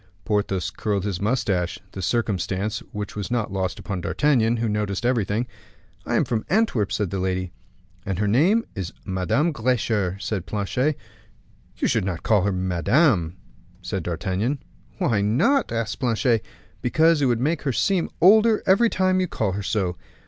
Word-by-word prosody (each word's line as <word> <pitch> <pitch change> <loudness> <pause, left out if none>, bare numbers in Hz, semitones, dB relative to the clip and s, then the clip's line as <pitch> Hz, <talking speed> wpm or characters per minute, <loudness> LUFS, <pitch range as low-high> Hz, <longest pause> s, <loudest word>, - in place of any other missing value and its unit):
Porthos 100 -4 0
curled 100 -3 -2
his 100 -3 -3
mustache, 100 -6 0 0.2
a 95 - -5
circumstance 100 +1 -1
which 105 0 -5
was 105 -1 -4
not 115 -5 -1
lost 95 -2 -2
upon 95 -3 -4
D'Artagnan, 120 -1 +2
who 115 0 -1
noticed 105 0 -2
everything. 115 -2 +1 0.6
"I - - 0
am - - +3
from 115 -2 -1
Antwerp," 190 - +1
said 105 -4 -1
the 100 - -2
lady. 90 -1 -2 0.5
"And 95 -2 -3
her 105 +1 0
name 175 - +3
is 95 -3 -5
Madame 95 - +1
Getcher," 110 -7 0
said 100 -3 -3
Planchet. 125 +8 -1 0.8
"You - - +1
should - - +1
not 90 -3 -3
call 105 -3 +3
her 100 +2 +1
madame," 90 - +2 0.5
said 95 - -3
D'Artagnan. 95 - -2 0.3
"Why 105 -3 +1
not?" 130 - +2
asked 115 -1 -2
Planchet. 120 -3 +1 0.4
"Because 160 +5 +3
it 135 - +3
would 120 -2 +1
make 155 +6 0
her 140 - -1
seem 180 - +1
older 215 +4 +5
every 200 +5 +4
time 185 -1 +2
you 185 - +1
call 110 - -1
her 100 +2 -3
so." 95 -4 -1
105 Hz, 165 wpm, -23 LUFS, 95-130 Hz, 0.8 s, older